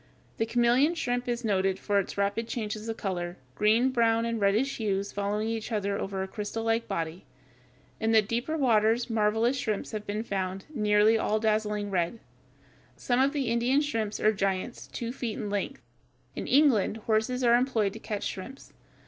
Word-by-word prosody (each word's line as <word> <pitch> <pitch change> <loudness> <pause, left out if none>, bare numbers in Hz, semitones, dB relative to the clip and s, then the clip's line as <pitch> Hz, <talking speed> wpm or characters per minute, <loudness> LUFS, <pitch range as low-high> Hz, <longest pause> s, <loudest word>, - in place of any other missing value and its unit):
The 225 - 0
chameleon 245 +7 +3
shrimp 245 -6 -2
is 240 -1 -2
noted 190 -2 +1
for 200 0 +1
its 195 - -4
rapid 200 +3 0
changes 215 -1 -4
of 225 - -3
color, 175 -3 -3 0.2
green, 225 - +3
brown, 230 -2 +2
and 230 -2 -2
reddish 215 +8 +2
hues 200 -2 -1
following 205 +2 -1
each 225 +1 -3
other 200 -2 0
over 195 -1 -3
its 190 - -8
crystallike 225 +2 -1
body. 165 +2 -3 0.8
In 220 0 +1
the 220 -1 +5
deeper 240 +9 -2
waters 230 -2 +2
marvelous 225 +4 +2
shrimps 215 -5 -2
have 215 -2 -5
been 210 +2 -2
found, 190 -2 -3
nearly 210 -1 +4
all 215 - 0
a - - -4
dazzling 210 -2 0
red. 180 +4 0 0.8
Some 245 0 0
of 275 +1 +3
the 290 -1 -1
East 230 - -1
Indian 240 +4 +2
shrimps 225 -8 -2
are 215 +1 +3
giants 195 +3 -2
two 235 0 -5
feet 240 -5 -4
in 205 - -4
length. 200 -10 -3 0.5
In - - -4
England 260 -7 +4
horses 225 +3 +1
are 235 -1 +6
employed 235 -6 +1
to 225 - -8
catch 210 -2 -4
shrimps. 260 +9 -7
220 Hz, 180 wpm, -28 LUFS, 205-235 Hz, 0.8 s, are